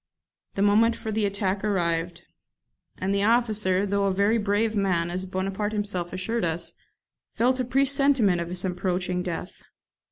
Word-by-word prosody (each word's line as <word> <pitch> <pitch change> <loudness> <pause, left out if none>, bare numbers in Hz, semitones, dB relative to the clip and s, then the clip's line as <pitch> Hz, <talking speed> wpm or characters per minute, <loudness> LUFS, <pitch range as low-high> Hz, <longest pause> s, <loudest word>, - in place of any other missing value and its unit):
The 195 - +1
moment 220 +3 +4
for 220 - -5
the 215 -1 +1
attack 200 -1 -1
arrived, 175 -3 -1 0.7
and 190 +1 -1
the 200 - +1
officer, 210 -4 +2
though 200 0 0
a 195 - +2
very 205 +4 +2
brave 210 +2 0
man, 175 -4 0
as 185 +1 -3
Bonaparte 195 +3 -2
himself 200 -5 -2
assured 215 +5 -2
us, 170 0 -2 0.6
felt 255 +3 +2
a - - +1
presentiment 270 -7 +2
of 170 - -5
his 180 +1 -3
approaching 180 0 -1
death. 180 0 -6
200 Hz, 155 wpm, -25 LUFS, 180-215 Hz, 0.7 s, moment